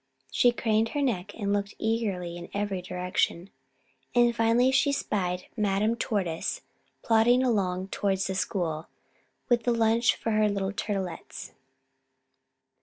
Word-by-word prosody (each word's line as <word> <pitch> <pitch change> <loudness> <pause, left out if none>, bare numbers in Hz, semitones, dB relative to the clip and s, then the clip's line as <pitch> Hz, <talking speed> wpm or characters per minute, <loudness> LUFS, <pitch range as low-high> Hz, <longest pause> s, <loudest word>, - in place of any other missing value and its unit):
She 245 - +4
craned 225 -1 +1
her - - +1
neck 205 -6 -2
and 200 -2 -1
looked 200 0 -2
eagerly 205 -6 -1
in 175 0 -8
every 200 -2 -1
direction. 180 0 -2 0.6
And 240 -1 +4
finally 230 +3 +3
she 280 +2 +3
spied 180 -9 -2
Madame 210 +1 +1
Tortoise 190 -8 -2 0.4
plodding 235 +3 +4
along 190 -6 0
towards 195 -1 0
the 190 - -2
school, 175 -4 -2 0.6
with 240 -1 +3
the 240 - +1
lunch 230 0 +3
for 225 - -3
her 215 0 +3
little 195 -1 -1
Turtlets. 195 -3 -4
205 Hz, 130 wpm, -27 LUFS, 185-230 Hz, 0.6 s, She